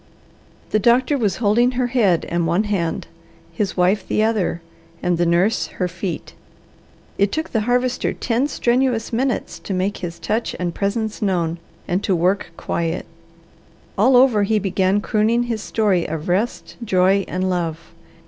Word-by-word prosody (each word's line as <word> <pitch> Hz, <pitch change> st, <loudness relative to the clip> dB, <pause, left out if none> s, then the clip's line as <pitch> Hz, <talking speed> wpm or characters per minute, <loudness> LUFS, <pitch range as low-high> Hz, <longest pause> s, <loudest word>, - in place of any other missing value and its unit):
The 215 Hz, -, +3 dB
doctor 245 Hz, +6 st, +3 dB
was 210 Hz, -9 st, 0 dB
holding 240 Hz, +3 st, +2 dB
her 250 Hz, 0 st, 0 dB
head 225 Hz, -9 st, +2 dB
and 170 Hz, -1 st, 0 dB
one 175 Hz, +6 st, +2 dB
hand, 190 Hz, -6 st, -2 dB, 0.5 s
his 190 Hz, +2 st, -2 dB
wife 185 Hz, +3 st, +2 dB
the 215 Hz, -, +1 dB
other, 215 Hz, -6 st, 0 dB, 0.4 s
and 175 Hz, -1 st, +1 dB
the 175 Hz, -, +2 dB
nurse 180 Hz, +6 st, +2 dB
her 180 Hz, -, 0 dB
feet. 175 Hz, +1 st, -5 dB, 0.9 s
It 200 Hz, 0 st, +3 dB
took 315 Hz, +1 st, -3 dB
the 225 Hz, -, +1 dB
Harvester 250 Hz, 0 st, +1 dB
ten 245 Hz, +3 st, 0 dB
strenuous 245 Hz, -3 st, 0 dB
minutes 255 Hz, +1 st, -1 dB
to 195 Hz, -, -4 dB
make 190 Hz, +3 st, -1 dB
his 170 Hz, -2 st, -6 dB
touch 225 Hz, +2 st, -2 dB
and 175 Hz, -1 st, -2 dB
presence 215 Hz, +3 st, -2 dB
known 175 Hz, -5 st, 0 dB, 0.3 s
and 180 Hz, +3 st, -1 dB
to 190 Hz, -, +1 dB
work 185 Hz, +4 st, +1 dB
quiet. 165 Hz, +1 st, -2 dB, 0.9 s
All 250 Hz, +6 st, +5 dB
over 250 Hz, -5 st, +5 dB
he 215 Hz, +2 st, +2 dB
began 195 Hz, 0 st, +1 dB
crooning 225 Hz, +2 st, +1 dB
his 230 Hz, -3 st, -3 dB
story 200 Hz, -6 st, +1 dB
of 155 Hz, 0 st, -5 dB
rest, 200 Hz, +7 st, -1 dB
joy, 195 Hz, -1 st, +3 dB
and 185 Hz, +1 st, -2 dB
love. 165 Hz, -3 st, -3 dB
200 Hz, 160 wpm, -21 LUFS, 180-230 Hz, 0.9 s, All